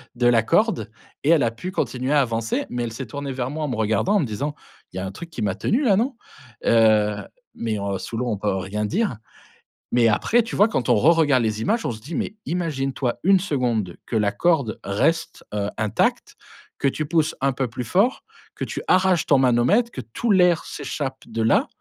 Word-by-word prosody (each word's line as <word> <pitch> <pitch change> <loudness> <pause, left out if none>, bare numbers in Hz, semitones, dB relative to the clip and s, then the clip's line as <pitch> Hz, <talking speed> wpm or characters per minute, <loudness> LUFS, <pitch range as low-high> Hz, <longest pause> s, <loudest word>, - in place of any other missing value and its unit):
de 120 0 +2
la 115 -2 +4
corde 205 - +1 0.3
et 145 - +1
elle 165 -5 +5
a 115 - +1
pu 145 +11 -6
continuer 130 -5 -1
à 145 - +5
avancer, 115 -3 -1
mais 125 0 -2
elle 115 -1 -4
s'est 130 +2 -6
tournée 140 +4 -5
vers 130 -1 -3
moi, 155 +2 -4
en - - -1
me 130 - -2
regardant, 110 - +1
en - - +4
me 160 - +1
disant: 135 +7 -3 0.4
«Il - - -7
y - - -1
a 95 - -3
un 95 - -5
truc 170 - -9
qui - - -6
m'a 100 -3 0
tenue, 240 +6 0
là, 215 -7 +4
non?» 245 +5 0 0.5
heu, 110 -2 +4 0.4
mais 110 -2 -2
heu, 100 -1 -2
sous 115 +5 -6
l'eau, 125 +2 -1
on 105 - -1
peut 105 0 -1
rien 100 +3 -3
dire. 195 - -1 0.7
Mais 120 -1 +4
après, 215 - +3
tu 230 - -6
vois, 205 - +5
quand 135 - -2
on 120 - +6
reregarde 145 +1 +4
les 110 -1 -1
images, 225 - 0
on - - 0
se 110 - -7
dit: 155 +8 -7
«Mais 210 - -3
imagine-toi 135 -7 -2
1 195 +1 +5
seconde 120 - -1
que - - -5
la 105 -2 +2
corde 140 -2 +1
reste, 160 +12 0
heu, 100 -1 -1
intacte, 110 -1 0 0.4
que 140 - +1
tu 155 +3 -1
pousses 155 0 +1
un 135 0 +2
peu 130 0 -1
plus 120 +2 -5
fort, 195 - +1 0.3
que - - -5
tu - - -5
arraches 185 -2 +3
ton 140 - +4
manomètre, 130 - +3
que 130 - -6
tout 130 - -2
l'air 180 -4 +4
s'échappe 135 -3 -5
de 115 - -3
là 110 - +3
130 Hz, 225 wpm, -23 LUFS, 110-165 Hz, 0.7 s, on